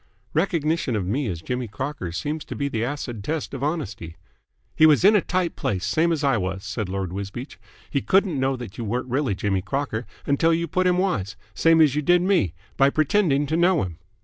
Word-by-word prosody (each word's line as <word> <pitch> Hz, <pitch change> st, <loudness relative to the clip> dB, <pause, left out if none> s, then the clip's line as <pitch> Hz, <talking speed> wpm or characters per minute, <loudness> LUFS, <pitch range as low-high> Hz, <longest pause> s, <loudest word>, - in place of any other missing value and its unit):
"Recognition 160 Hz, -6 st, 0 dB
of 100 Hz, -4 st, -1 dB
me 125 Hz, +8 st, -1 dB
as 85 Hz, -5 st, -4 dB
Jimmy 125 Hz, +3 st, -3 dB
Crocker 130 Hz, -, -5 dB
seems 145 Hz, -, -3 dB
to -, -, -7 dB
be 140 Hz, -, -1 dB
the 115 Hz, -5 st, -2 dB
acid 120 Hz, -5 st, -4 dB
test 155 Hz, +2 st, -3 dB
of 135 Hz, -, -5 dB
honesty." 140 Hz, -, -3 dB, 0.6 s
"He 155 Hz, -, +7 dB
was 155 Hz, +3 st, +4 dB
in 210 Hz, +2 st, +7 dB
a 205 Hz, -, +5 dB
tight 180 Hz, -1 st, -1 dB
place, 95 Hz, -3 st, -2 dB
same 160 Hz, -, +2 dB
as 155 Hz, -3 st, -1 dB
I 135 Hz, -4 st, +3 dB
was," 95 Hz, 0 st, -3 dB
said 105 Hz, -5 st, -4 dB
Lord 95 Hz, -2 st, -3 dB
Wisbeach. 100 Hz, +7 st, -6 dB, 0.3 s
"He 140 Hz, -, -1 dB
couldn't 190 Hz, -6 st, +2 dB
know 135 Hz, 0 st, +1 dB
that 120 Hz, -5 st, -8 dB
you -, -, -2 dB
weren't 120 Hz, +4 st, -2 dB
really 130 Hz, -6 st, 0 dB
Jimmy 95 Hz, -1 st, 0 dB
Crocker 115 Hz, +3 st, -3 dB, 0.2 s
until 160 Hz, +4 st, +3 dB
you 170 Hz, +1 st, -2 dB
put 185 Hz, +3 st, +1 dB
him 180 Hz, 0 st, +3 dB
wise 105 Hz, -, -1 dB, 0.2 s
same 165 Hz, 0 st, +4 dB
as 150 Hz, -4 st, +5 dB
you 150 Hz, -, 0 dB
did 175 Hz, +3 st, +3 dB
me 180 Hz, -, +2 dB, 0.2 s
by 135 Hz, 0 st, +5 dB
pretending 155 Hz, -1 st, +2 dB
to 155 Hz, +3 st, -1 dB
know 175 Hz, 0 st, +3 dB
him." 85 Hz, -3 st, -7 dB
140 Hz, 215 wpm, -24 LUFS, 105-160 Hz, 0.6 s, He